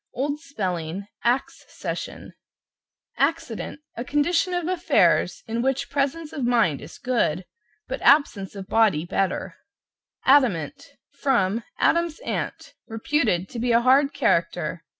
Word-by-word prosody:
Old 285 +3 -1
spelling, 185 - -4 0.2
Axe 245 +3 0
session. - - -6 0.9
=ACCIDENT= 295 -3 -1
A 235 - -4
condition 295 +7 +1
of 350 -2 -1
affairs 360 -1 +2
in 230 0 -2
which 265 +1 -1
presence 285 +3 -1
of 280 - -4
mind 230 - +2
is 155 - -11
good, 190 -9 0 0.4
but 265 - -4
absence 220 -10 +3
of 195 -1 -7
body 205 -9 +3
better. 190 +2 -2 0.7
=ADAMANT= 265 - +3 0.2
From 235 -7 0
"Adam's 335 -2 +2
Aunt," - - -4
reputed 225 -5 0
to 235 - -6
be 240 +1 0
a 235 0 +5
hard 270 +3 +4
character. - - 0
255 Hz, 125 wpm, -24 LUFS, 200-290 Hz, 0.9 s, a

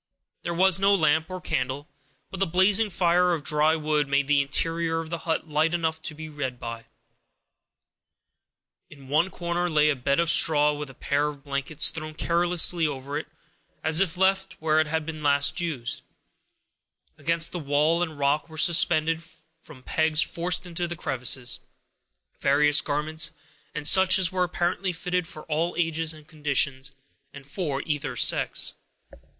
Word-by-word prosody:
There 170 - -4
was 190 +1 +3
no 200 +1 +4
lamp 160 -1 +1
or 185 0 -6
candle, 130 -2 -3 0.4
but 190 - -7
the 195 - +1
blazing 190 +5 +3
fire 175 -1 +2
of 155 - -7
dry 150 +2 +2
wood 150 -2 0
made 140 0 0
the 145 -1 +3
interior 165 +3 -1
of 165 0 -7
the 170 - -3
hut 160 0 -1
light 155 +2 +1
enough 160 -1 -2
to 160 -1 -5 0.2
read 135 -4 -4
by. 115 -1 -7 2.0
In 140 -2 -15
one 160 +6 +2
corner 175 0 -3
lay 150 -1 +3
a - - -1
bed 140 +4 0
of 170 -1 +3
straw, 150 -3 +4
with 145 -1 -6
a 135 - -14
pair 145 +1 -1
of 145 -2 -8
blankets 140 +1 -1
thrown 155 -1 -8
carelessly 170 0 +2
over 140 0 -6
it, 155 - -4 0.6
as 160 +1 +1
if 185 -2 0
left 190 0 +1
where 155 0 +2
they 155 - -9
had 160 0 -2
last 140 +1 +2
been 175 - -1
used. 125 -7 -4 1.2
Against 165 +3 +1
the 175 - -4
walls 150 +3 +1
and 160 -4 -3
rock 145 +3 0
were 160 - -10
suspended, 165 -1 +4 0.4
from 140 -6 -15
pegs 160 +1 0
forced 175 +3 -1
into 175 0 -3
the 175 - -5
crevices, 125 -3 -1 0.8
various 150 +1 +3
garments, 155 +2 -1 0.5
and 150 -1 -1
such 190 +1 +6
as 185 -2 +3
were 185 -1 0
apparently 180 +1 -1
fitted 180 0 -3
for 155 - -10
all 165 +2 -2
ages 165 -2 0
and 155 -2 -10
conditions, 140 -3 -1 0.4
and 145 -1 -12
for 145 -2 -4
either 150 -2 -3
sex. - - +3
155 Hz, 165 wpm, -25 LUFS, 145-170 Hz, 2.0 s, such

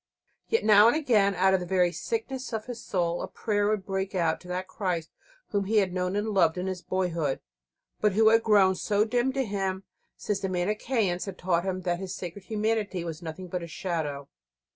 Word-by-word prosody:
Yet 455 - +1
now 210 0 +8
and 235 - +4
again, 215 -10 +3
out 190 +2 +3
of 190 - +3
the 180 - -5
very 180 -1 +3
sickness 245 +7 -4
of 220 -1 -3
his 245 -2 -7
soul, 175 -2 -1
a - - -4
prayer 205 -2 -1
would 210 -2 0
break 190 0 -3
out 165 -3 +1
to 180 - -14
that 180 +1 -3
Christ 180 -4 -3 0.4
Whom 200 -1 0
he 215 +3 +1
had 190 -3 +2
known 180 +1 -1
and 210 +2 -1
loved 180 -5 +3
in 180 - -2
his 185 -1 -3
boyhood, 170 -7 -1 0.6
but 210 -2 +2
Who 220 +2 +5
had 225 +1 +5
grown 205 -4 +5
so 205 +3 +1
dim 245 +3 +1
to 270 -1 0
him 195 -2 -2 0.3
since 205 -2 -2
the 190 - -2
Manicheans 190 +1 0
had 195 -2 -7
taught 175 -1 0
him 185 -1 -2
that 175 -1 -1
His 190 0 -5
Sacred 180 +2 -7
Humanity 215 -4 -1
was 165 -1 -6
nothing 170 +2 -7
but 180 0 -3
a 170 - -6
shadow. 155 -5 -3
190 Hz, 210 wpm, -27 LUFS, 180-215 Hz, 0.6 s, now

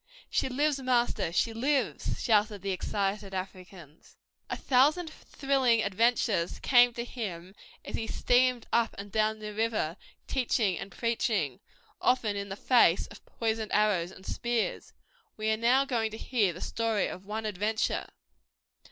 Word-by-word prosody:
"She - - +1
lives, 285 +2 +1
master, 245 -9 +1
she 225 +6 +1
lives!" 270 +4 -1
shouted 210 -3 +2
the 195 - -1
excited 195 +1 -2
Africans. 185 -4 -9 0.3
A - - -3
thousand 300 +6 +2
thrilling 265 -7 +1
adventures 200 -3 +1
came 245 -1 +5
to 235 0 -4
him 190 -7 -6 0.3
as - - -7
he 225 - -3
steamed 250 0 +2
up 235 -1 +2
and 200 0 -8
down 215 +1 +1
the 210 -1 -7
river, 215 -6 -1 0.3
teaching 230 -7 +1
and 195 - -7
preaching, 215 - -1 0.4
often 230 -5 +2
in 200 0 -4
the 195 - -4
face 205 -6 +4
of 205 - -13
poisoned 220 -2 -2
arrows 205 -5 +2
and 190 0 -14
spears. 235 -2 -2 0.5
We 215 0 0
are - - +3
now 250 +4 +3
going 235 -5 0
to 220 - -8
hear 225 -6 +1
the 175 - -10
story 225 -3 0
of 190 +2 -7
one 220 +1 -4
adventure. 210 +2 -1
220 Hz, 150 wpm, -29 LUFS, 195-245 Hz, 0.5 s, came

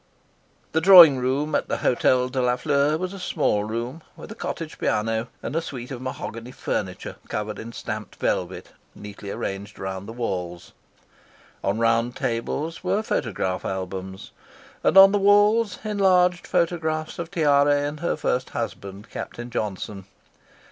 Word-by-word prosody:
The 160 - +1
drawing 170 -6 +9
room 135 +4 -1
at - - 0
the - - -1
Hotel 125 +1 +2
de 130 0 -2
la 125 0 +2
Fleur 145 +2 +1
was 185 +2 -4
a 195 - -8
small 145 - 0
room, 120 +8 -4 0.2
with - - -10
a - - -4
cottage - - -6
piano, 110 +2 0 0.2
and - - -4
a 165 - +1
suite 130 -5 -7
of 125 -2 -6
mahogany 130 -2 -6
furniture, 95 -7 -4
covered 105 -1 -4
in 115 - -7
stamped - - -6
velvet, - - -2 0.3
neatly 105 -1 -9
arranged 100 +1 -5
around 95 +1 -5
the - - -6
walls. 90 -7 -4 0.9
On 100 +2 0
round 115 +1 +1
tables 145 +9 -3
were 195 +4 0
photograph 95 - -2
albums, 95 0 -5 0.5
and - - +3
on 195 0 +10
the 205 - +2
walls 205 +1 +4
enlarged 185 -4 +2
photographs 160 -2 -1
of 170 -1 -4
Tiare 145 -3 +3
and 145 +1 -4
her 170 - -1
first 125 +1 -1
husband, 100 -3 -6
Captain 120 +1 -7
Johnson. 100 -3 -4
125 Hz, 150 wpm, -24 LUFS, 105-165 Hz, 0.9 s, on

